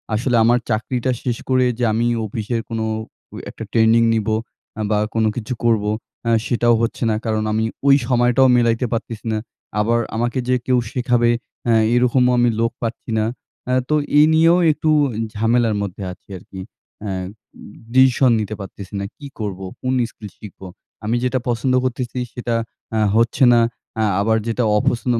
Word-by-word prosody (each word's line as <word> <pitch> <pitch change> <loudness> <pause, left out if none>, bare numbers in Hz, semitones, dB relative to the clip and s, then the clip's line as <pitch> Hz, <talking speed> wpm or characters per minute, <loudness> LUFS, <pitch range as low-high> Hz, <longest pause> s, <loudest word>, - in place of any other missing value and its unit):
আসলে 120 +2 0
আমার 120 +2 +4
চাকরিটা 120 +3 -1
শেষ 120 -2 -1
করে 130 0 +3
যে 125 - 0
আমি 115 +2 +1 0.2
অফিসের 110 +2 -3
কোনো 110 -1 -2 0.5
অ - - -8
একটা - - -8
ট্রেনিং 115 +1 +4
নিব 110 -1 -1 0.5
অ্যা 110 - -3
বা 105 - +3 0.2
কোনো 110 -1 +2
কিছু 120 +1 -4
করব, 115 -3 +2 0.4
অ্যা 115 - 0 0.2
সেটাও 120 -1 +3
হচ্ছে 115 +2 -2
না। 110 - +1
কারণ 110 -1 0
আমি 110 +1 +1 0.2
ওই 140 - +7
সময়টাও 125 +1 +3
মিলাইতে 115 +1 +2
পারতেসি 115 -1 -5
না। 110 - 0 0.4
আবার 115 +3 +2 0.2
আমাকে 120 +3 -1
যে 125 - +4
কেউ 130 -1 +2
শেখাবে, 120 -1 +1 0.4
হ্যাঁ, 115 -2 +4
এই - - +4
রকমও 125 0 +3
আমি 120 0 +4
লোক 115 +1 +1
পাচ্ছি 115 0 -5
না। 110 - +1 0.4
অ্যা 125 - 0
তো 150 - +3 0.2
এই 150 - +8
নিয়েও 165 +2 +5
একটু 155 +1 -1 0.5
ঝামেলার 115 0 +2
মধ্যে 100 0 -5
আছি - - -15
আর - - -14
কী। 95 - -9 0.4
অ্যা 100 -2 -4 0.8
ডিসিশন 130 -1 +5
নিতে 110 0 -3
পারতেসি 100 +1 -9
না। 100 - -3
কী 145 - -9
করব? 100 -3 -4 0.2
কোন 130 0 -1 0.2
স্কিল 105 -2 -11
শিখব? 105 -3 -12 0.4
আমি 115 - 0
যেটা 130 +1 0
পছন্দ 120 +2 0
করতেসি, 125 0 -3
সেটা 120 -1 -2 0.4
অ্যা 110 -1 0
হচ্ছে 115 +4 +2
না। 120 - +5 0.4
অ্যা 110 -1 +1 0.2
আবার 110 +1 +2
যেটা 115 +2 0
অপছন্দ 120 +3 0
115 Hz, 175 wpm, -20 LUFS, 110-125 Hz, 0.8 s, এই